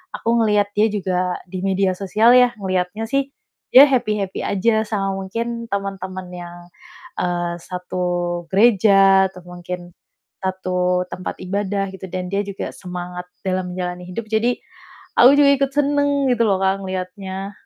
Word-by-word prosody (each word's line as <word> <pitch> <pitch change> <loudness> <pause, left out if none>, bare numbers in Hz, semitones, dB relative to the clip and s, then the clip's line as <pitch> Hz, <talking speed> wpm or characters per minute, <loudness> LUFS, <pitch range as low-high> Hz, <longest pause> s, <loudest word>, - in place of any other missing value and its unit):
aku - - -3
ngelihat 210 -1 +2
dia 215 +1 +5
juga 185 -3 -1
di 185 -1 -5
media 190 -1 +1
sosial 215 +5 +4
ya, 250 -1 +5
ngelihatnya 185 +3 -2
sih 275 0 0 0.4
dia 270 +3 +11
happy-happy 210 -7 -1
aja 220 +3 +2
sama 195 -2 -1
mungkin 230 +5 -4
temen-temen 190 -2 -4
yang, 175 -1 -8 0.6
eee, 175 -1 -1
satu 180 0 -4 0.5
gereja 195 -2 +5
atau 180 - -12
mungkin 175 0 -7 0.5
satu 180 -1 0
tempat 185 - -5
ibadah 195 +1 -2
gitu 190 0 -8
dan 185 -1 -3
dia 200 - 0
juga 200 -1 -5
semangat 180 -1 -7 0.2
dalam 185 -1 -2
menjalani 180 -1 -4
hidup. 225 +5 -4
Jadi, 225 +3 +1 0.6
aku 250 +3 +8
juga 280 -1 +6
ikut 275 0 +1
seneng 285 -1 +2
gitu 235 -1 +2
loh, 195 - +3
Kak, 190 +1 +1
ngeliatnya. 190 +1 -5
195 Hz, 145 wpm, -20 LUFS, 180-215 Hz, 0.6 s, dia